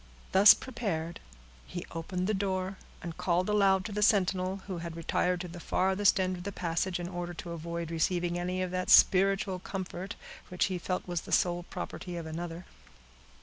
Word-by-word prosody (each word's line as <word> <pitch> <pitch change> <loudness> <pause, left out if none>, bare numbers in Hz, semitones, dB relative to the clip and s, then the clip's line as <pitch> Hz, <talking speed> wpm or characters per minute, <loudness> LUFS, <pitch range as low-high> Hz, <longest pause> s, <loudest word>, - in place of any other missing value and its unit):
Thus 195 +2 +9
prepared, 175 -10 -4 0.5
he 175 -1 -6
opened 180 +2 -3
the 215 - +1
door, 190 -1 -1 0.3
and 170 -2 -5
called 180 0 +1
aloud 195 -2 +3
to 220 - -4
the 210 +1 -2
sentinel, 190 -2 +2
who 185 -3 -4
had 170 -1 -6
retired 175 +2 0
to 180 - -5
the 175 0 -9
farthest 190 +3 +2
end 185 -1 0
of 175 - -8
the 200 - -4
passage, 175 0 -1
in 175 - -4
order 175 -1 -5
to 170 +1 -7
avoid 170 0 -4
receiving 175 +1 0
any 180 +1 -1
of 180 - -3
that 185 0 -2
spiritual 195 0 +5
comfort, 190 +1 -5 0.3
which 180 - +1
he 180 - -2
felt 185 +2 -3
was 175 -2 -2
the - - -11
sole 175 -1 +2
property 175 -2 -6
of 165 - -5
another. 165 +2 -6
180 Hz, 185 wpm, -30 LUFS, 175-190 Hz, 0.5 s, Thus